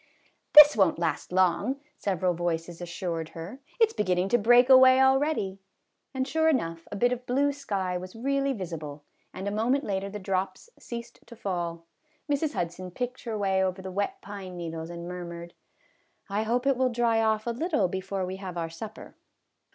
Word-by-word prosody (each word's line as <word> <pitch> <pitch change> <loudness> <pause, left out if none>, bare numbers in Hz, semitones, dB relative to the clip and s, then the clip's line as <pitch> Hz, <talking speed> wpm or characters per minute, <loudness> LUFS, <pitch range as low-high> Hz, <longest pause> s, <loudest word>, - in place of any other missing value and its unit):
" - - -45
This 300 0 +11
won't 190 -6 +3
last 170 0 -2
long, 185 +9 +2
" 300 - -39
several 185 -2 0
voices 170 0 -3
assured 170 -2 -4
her; 185 +11 -7
" - - -30
it 450 -1 +5
's - - -15
beginning 185 -2 0
to 240 - +3
break 240 +3 +6
away 260 0 +8
already," 265 -7 +2 0.5
and 265 -1 -2
sure 320 +3 +2
enough, 165 - -1
a - - -4
bit 245 +5 +2
of 250 0 -4
blue 280 +3 +2
sky 195 -10 -3
was 185 +2 -9
really 275 +3 0
visible, 160 - -6 0.3
and 190 +2 -6
a - - -1
moment 240 +7 +1
later 195 -3 -2
the 210 - -6
drops 195 - -3
ceased 235 -1 -8
to 235 - -11
fall. 175 -5 -4 0.4
Mrs. 290 +1 0
Hud 170 -1 -1
son 185 +1 -8
picked 250 +7 -5
her 225 -2 -3
way 190 -2 +1
over 185 0 -1
the 190 - -6
wet 200 +2 -2
pine 195 -3 -8
needles 165 -1 -5
and 170 0 -7
murmured, 170 -1 -7 0.4
" - - -40
I 205 +2 0
hope 240 +4 0
it 275 -2 +3
will 260 0 +2
dry 235 -2 +2
off 220 -1 +1
a 235 - 0
little 300 - 0
before 190 +1 -3
we 185 +1 -5
have 185 -2 -7
our 165 -1 -3
supper." 215 +6 -9
200 Hz, 200 wpm, -27 LUFS, 180-250 Hz, 0.5 s, This